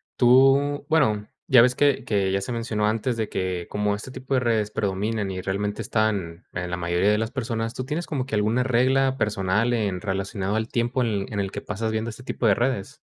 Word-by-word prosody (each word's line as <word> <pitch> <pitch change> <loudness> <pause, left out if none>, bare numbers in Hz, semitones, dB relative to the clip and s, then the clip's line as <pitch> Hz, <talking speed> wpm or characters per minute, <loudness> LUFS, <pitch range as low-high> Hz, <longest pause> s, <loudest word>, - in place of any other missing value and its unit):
Tú, 135 +3 +4
bueno, 110 -10 +2 0.2
ya 125 -3 +7
ves 125 +1 +4
que 140 -2 +2
que 100 -6 +1
ya 95 - +1
se 120 +5 -4
mencionó 115 -2 -1
antes, 115 +3 -1
de 110 -1 -1
que 90 -2 -3
como 105 0 0
este 105 +5 -6
tipo 130 +1 -6
de - - +4
redes 110 -4 0
predominan, 100 +1 -1
y 95 0 -4
realmente 100 +3 -2
están 100 -6 -1
en 90 0 -3
la 90 - -2
mayoría 90 +3 +1
de 105 - +2
las 110 0 -1
personas, 115 -3 -3
¿tú 130 - -4
tienes 155 +6 -3
como 135 -5 -2
que 130 - -3
alguna 110 +4 +2
regla 130 +2 +2
personal 105 +1 +1
en 100 -6 -1
relacionado 95 +1 -2
al 110 +1 -1
tiempo 120 +2 0
en 120 - +1
el 100 -2 -1
en 100 - 0
el 95 -1 -3
que - - -4
pasas 110 +2 -3
viendo 110 +1 -2
este 115 +2 -10
tipo 125 - -1
de 100 - +5
redes? 120 -4 -2
110 Hz, 225 wpm, -24 LUFS, 100-125 Hz, 0.2 s, ya